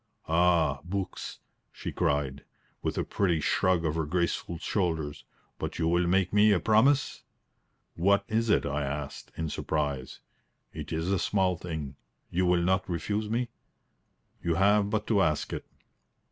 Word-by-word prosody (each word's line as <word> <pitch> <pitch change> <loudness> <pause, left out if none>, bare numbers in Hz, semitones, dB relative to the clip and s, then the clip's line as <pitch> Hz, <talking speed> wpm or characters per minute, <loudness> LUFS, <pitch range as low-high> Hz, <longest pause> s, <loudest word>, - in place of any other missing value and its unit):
"Ah, 85 -4 +3
books!" 95 +1 -5 0.3
she - - -6
cried, 70 -1 0 0.4
with - - -2
a - - +1
pretty 90 -5 +1
shrug 90 +2 +2
of 75 - +1
her 80 -2 -1
graceful 85 0 -1
shoulders. 80 -5 -2 0.3
"But - - -4
you 80 - +1
will 85 +1 +2
make 95 +1 +2
me 105 +1 +6
a 100 - +4
promise?" 130 +8 +3 0.7
"What 100 +4 +2
is 115 +1 0
it?" - - +3
I 70 +1 -1
asked, 70 0 -5
in 80 - -2
surprise. 70 -4 -2 0.5
"It - - -7
is 80 +3 -1
a 100 - +2
small 95 -2 +1
thing. 80 -5 -6 0.3
You 90 +1 +1
will 90 -1 +3
not 95 +2 +1
refuse 105 +6 -2
me?" 120 +2 0 0.9
"You 85 -1 0
have 100 +2 +4
but 105 0 -1
to 105 -4 +3
ask 75 -4 0
it." - - -5
90 Hz, 155 wpm, -29 LUFS, 80-100 Hz, 0.9 s, me